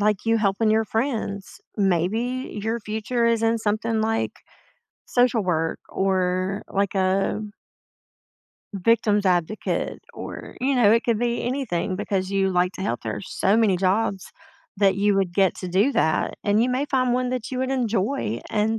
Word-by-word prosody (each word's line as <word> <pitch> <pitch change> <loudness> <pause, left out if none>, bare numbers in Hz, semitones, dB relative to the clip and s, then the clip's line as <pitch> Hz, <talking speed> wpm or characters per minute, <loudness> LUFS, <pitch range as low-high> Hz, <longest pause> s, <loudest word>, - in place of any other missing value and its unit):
like 210 0 +1
you 225 0 +3
helping 215 +1 +1
your 220 0 +3
friends, 220 -5 -3 0.2
maybe 210 +7 0
your 225 +2 -1
future 220 +3 -1
is 230 -1 +2
in 225 0 +2
something 220 +1 0
like 225 +1 0 0.7
social 245 -2 +2
work 165 -3 -1
or 190 +1 0
like 200 0 -1
a 190 +2 +1 1.3
victim's 210 0 +2
advocate 180 +3 -1
or, - - -8
you 270 +1 +1
know, 235 -5 +5
it 230 +1 +3
could 230 -3 +1
be 240 0 -1
anything 240 -9 -2
because 195 -2 -2
you 195 -1 +1
like 180 0 +1
to 190 - -7
help, 120 - -2
there 110 -2 -3
are 105 - -5
so 195 - +1
many 215 -5 +3
jobs 195 +1 0 0.4
that 195 -1 +3
you 205 0 +2
would 190 -3 0
get 190 -1 +3
to 185 - -6
do 195 +9 +3
that, 160 - +1
and 210 +2 +3
you 245 - +1
may 255 +3 0
find 255 -3 +1
one 250 0 0
that 250 -3 -3
you 260 - -4
would 260 0 -1
enjoy, 225 - -1
and 220 +1 +1
210 Hz, 170 wpm, -24 LUFS, 190-230 Hz, 1.3 s, know